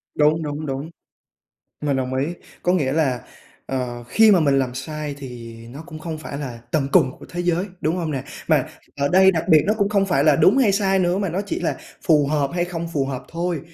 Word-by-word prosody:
Đúng, 155 +2 +3
đúng, 150 +1 -4
đúng, 135 +3 -4 0.9
mình 145 -2 0
đồng 130 0 -2
ý. 135 +2 0 0.4
Có 180 - +2
nghĩa 145 -8 +1
là, 135 -6 +1 0.5
ờ, 125 -2 -3
khi 220 - +6
mà 185 -4 +5
mình 140 -3 +3
làm 125 -2 -1
sai 150 +2 -5
thì 120 -4 -9
nó 140 +6 -9
cũng 155 -3 -9
không 160 0 -5
phải 140 -2 -6
là 130 -5 -6
tận 150 -5 0
cùng 130 - +5
của - - -12
thế 175 - -4
giới, 175 +1 +1 0.2
đúng 160 +4 0
không 165 -3 -2
nè? 135 -2 -3 0.2
Mà - - +3 0.3
ở 140 0 +1
đây 190 +3 +6
đặc 165 -3 -1
biệt 155 -2 +7
nó 210 - +3
cũng 200 - +2
không 200 -1 +2
phải 180 - +2
là - - +5
đúng 240 - +5
hay 230 -7 +4
sai 195 -1 +2
nữa, 180 +1 +1
mà 195 -3 -1
nó 180 +4 -2
chỉ - - -3
là 175 - -1 0.3
phù 150 -3 +4
hợp 145 -1 0
hay 175 -1 +1
không 170 -1 -5
phù 140 -4 +1
hợp 135 -1 -4
thôi, 170 -1 -2
155 Hz, 235 wpm, -22 LUFS, 135-175 Hz, 0.9 s, biệt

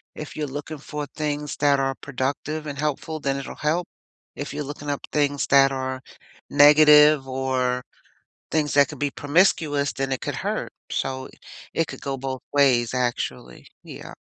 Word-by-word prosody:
if 155 - -8
you're 150 -1 -2
looking 145 +3 -6
for 150 0 -6
things 150 -1 -3
that 140 -1 +3
are 135 0 0
productive 140 +4 -3
and 145 -1 -5
helpful, 150 +2 -2
then 140 -2 -1
it'll 135 - -7
help; 165 +4 -1 0.5
if 145 -1 -6
you're 150 +1 -3
looking 145 +1 -7
up 140 - -2
things 145 -1 0
that 135 -1 +6
are 130 -1 -3 0.5
negative 150 -1 +7
or 130 -1 -1 0.7
things 150 -3 +1
that 140 -1 +5
could - - -10
be 145 -1 0
promiscuous, 145 -2 +2
then 135 0 -3
it 130 - -2
could - - -4
hurt; - - -3 0.2
so, 130 0 -3 0.5
it 165 - 0
could - - -8
go 135 -1 -3
both 130 0 -5
ways 130 -5 +3
actually. 120 - -3 0.2
Yeah. - - -10
145 Hz, 165 wpm, -24 LUFS, 135-150 Hz, 0.7 s, negative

